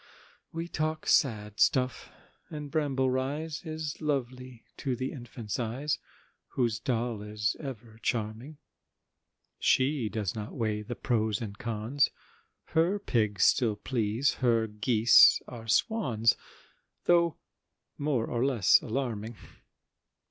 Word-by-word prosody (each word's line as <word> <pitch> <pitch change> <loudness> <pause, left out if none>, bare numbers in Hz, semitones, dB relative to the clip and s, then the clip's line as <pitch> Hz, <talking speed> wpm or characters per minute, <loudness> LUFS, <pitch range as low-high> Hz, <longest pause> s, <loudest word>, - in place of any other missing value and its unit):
We 165 +1 -4
talk 155 -1 -2
sad 105 -6 +1
stuff,—and 140 +3 -2
Bramble 135 -4 +1
Rise 145 +4 -2
Is 155 -2 -5
lovely 130 -4 -3
to 130 -3 -2
the 130 +2 -3
infant's 120 -5 -6
eyes, 130 +6 -2 0.6
Whose 120 -3 +1
doll 120 -3 -2
is 105 +1 -2
ever 115 -5 -8
charming; 115 +5 -3 1.0
She 130 -3 +2
does 105 -4 -2
not 105 -1 -6
weigh 110 -3 -1
the 120 +3 -6
pros 110 -4 0
and 105 -3 -6
cons, 115 +5 0 0.6
Her 170 +5 +2
pigs 110 - 0
still 115 -5 +4
please, 115 +3 0
her 115 -3 +3
geese 110 +2 +6
are 115 -2 -9
swans, 115 - +2 0.7
Though 170 -2 +3 0.6
more 140 -6 0
or 120 0 -1
less 125 -8 +4
alarming! 115 -2 -3
120 Hz, 110 wpm, -29 LUFS, 110-140 Hz, 1.0 s, geese